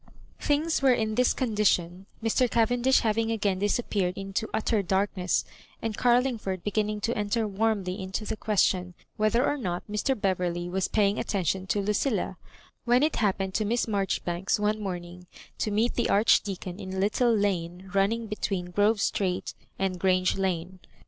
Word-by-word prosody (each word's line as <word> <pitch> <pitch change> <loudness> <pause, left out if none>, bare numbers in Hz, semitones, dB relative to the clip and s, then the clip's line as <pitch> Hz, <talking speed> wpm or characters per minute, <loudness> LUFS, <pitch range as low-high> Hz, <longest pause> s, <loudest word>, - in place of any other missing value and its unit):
Things 300 +2 +1
were 265 -2 +5
in 220 -2 -1
this 250 +2 +3
condition, 195 -6 0 0.2
Mr. 240 +2 +2
Cavendish 245 +3 +3
having 225 0 +1
again 205 -4 0
disappeared 200 -3 0
into 195 +3 -3
utter 220 -1 +1
darkness, 190 -1 0 0.3
and 225 -2 -3
Carlingford 240 -7 +1
beginning 210 +1 -1
to 230 +3 -1
enter 215 +2 0
warmly 200 -2 -1
into 190 +3 -4
the - - -3
question, 185 -4 +1 0.2
whether 215 +4 +2
or 290 - 0
not 180 -9 -3
Mr. 210 +5 -1
Beverley 180 -3 -1
was 185 +1 -1
paying 205 -1 +1
attention 190 -1 -1
to 205 - +1
Lucilla, 210 -1 -1 0.5
when 245 +3 +3
it 310 - +1
happened 195 -3 0
to 215 - +1
Miss 235 +3 0
Maijoribanks 195 -3 -1
one 210 +1 0
morning 180 -2 -6 0.3
to - - 0
meet 220 +4 +1
the 240 - 0
Archdeacon 195 -3 +2
in 190 -2 -6
a - - -2
little 215 +5 +2
lane 190 -3 -1
running 220 +4 +1
betweenGrove 205 +1 0
Street 185 -2 -1 0.2
and 190 -2 -1
Grange 185 0 +2
Lane. 185 -1 -2
205 Hz, 155 wpm, -27 LUFS, 185-225 Hz, 0.5 s, were